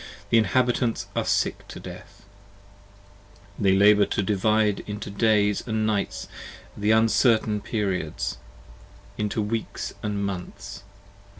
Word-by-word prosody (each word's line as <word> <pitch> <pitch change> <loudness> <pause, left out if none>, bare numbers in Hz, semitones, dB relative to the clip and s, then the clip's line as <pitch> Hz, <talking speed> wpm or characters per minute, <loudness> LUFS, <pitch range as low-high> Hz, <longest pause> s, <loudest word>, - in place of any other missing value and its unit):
The 115 - +6
inhabitants 120 +2 +1
are - - +1
sick - - 0
to - - -9
death: - - -11 1.3
they 95 -2 +4
labour 105 +1 +6
to 105 - -1
divide 105 +1 +2
into 105 -1 -5
Days 105 -1 +2
And 110 -1 0
Nights, 105 -2 -1 0.5
the 105 +1 -1
uncertain 110 -1 +3
Periods: 90 - -2 0.8
and 105 - +1
into 105 +1 -1
Weeks 110 +2 -4
& - - -23
Months. 100 -1 -4
105 Hz, 115 wpm, -25 LUFS, 100-110 Hz, 1.3 s, The